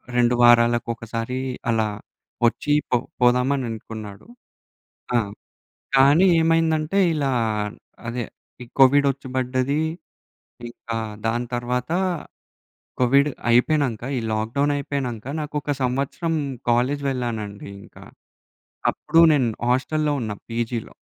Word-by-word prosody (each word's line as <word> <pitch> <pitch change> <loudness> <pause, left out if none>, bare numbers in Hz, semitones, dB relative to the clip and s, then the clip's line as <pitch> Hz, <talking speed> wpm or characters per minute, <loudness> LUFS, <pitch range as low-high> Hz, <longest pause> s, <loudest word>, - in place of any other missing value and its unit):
2 120 0 +3
వారాలకు 120 0 +5
ఒకసారి 115 +2 -4 0.3
అలా 110 -1 +2 0.6
వచ్చి 145 +5 +1 0.2
పొ 125 - +3 0.2
పోదామని 125 +2 +3
అనుకున్నాడు. 110 - -8 0.9
ఆ! - - +5 0.8
కానీ 140 +7 +6
ఏమైందంటే, 165 +2 +2
ఇలా 140 -3 0 0.8
అదే 120 +1 -3 0.4
ఈ - - -11
కోవిడ్ 140 +2 +6
వచ్చి 135 0 -11
బడ్డది. 130 +3 0 0.9
ఇంక 120 - -20 0.4
దాని 120 +2 0
తర్వాత 125 +2 -2 1.1
కోవిడ్ 140 +4 +4 0.2
అయిపోయినంక, 125 -1 +2
ఈ - - 0
లాక్ 110 +1 -2
డౌన్ 145 +1 +2
అయిపోయినంక 130 -6 -4 0.2
నాకొక 150 0 -3
సంవత్సరం 140 +6 -1 0.4
కాలేజ్ 130 +4 +1
వెళ్ళానండి 110 -6 -4
ఇంకా. - - -15 0.9
అప్పుడు 165 +2 +2
నేను 135 -5 +2 0.2
హాస్టల్‌లో 150 +3 0
ఉన్న 110 -3 -3 0.2
పీజీలో. 115 0 -3
125 Hz, 105 wpm, -23 LUFS, 120-145 Hz, 1.1 s, కానీ